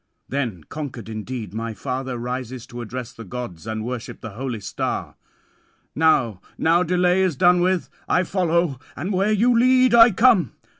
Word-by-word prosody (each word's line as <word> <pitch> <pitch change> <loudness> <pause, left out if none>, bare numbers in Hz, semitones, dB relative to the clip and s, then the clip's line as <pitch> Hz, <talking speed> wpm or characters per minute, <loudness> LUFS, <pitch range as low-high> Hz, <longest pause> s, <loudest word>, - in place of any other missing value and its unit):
Then 120 - -3
conquered 130 - -7
indeed 110 -2 -6
my 115 0 -4
father 130 +3 -4
rises 125 0 -5
to 120 0 -8
address 125 +2 -6
the 115 - -10
gods 110 -4 -7
and 110 0 -3
worship 125 -1 -5
the 115 - -8
holy 120 +1 -4
star. 100 - -4 0.8
"Now, 130 - +2 0.2
now 170 +2 +3
delay 180 +1 +2
is 185 -5 +1
done 175 +5 +4
with: 185 0 +1 0.2
I 180 - +3
follow, 170 -6 0 0.2
and 180 +7 -3
where 195 +3 +2
you 235 +4 +3
lead, 255 +1 +4
I 235 0 +9
come. 220 - +4
135 Hz, 160 wpm, -22 LUFS, 115-180 Hz, 0.8 s, I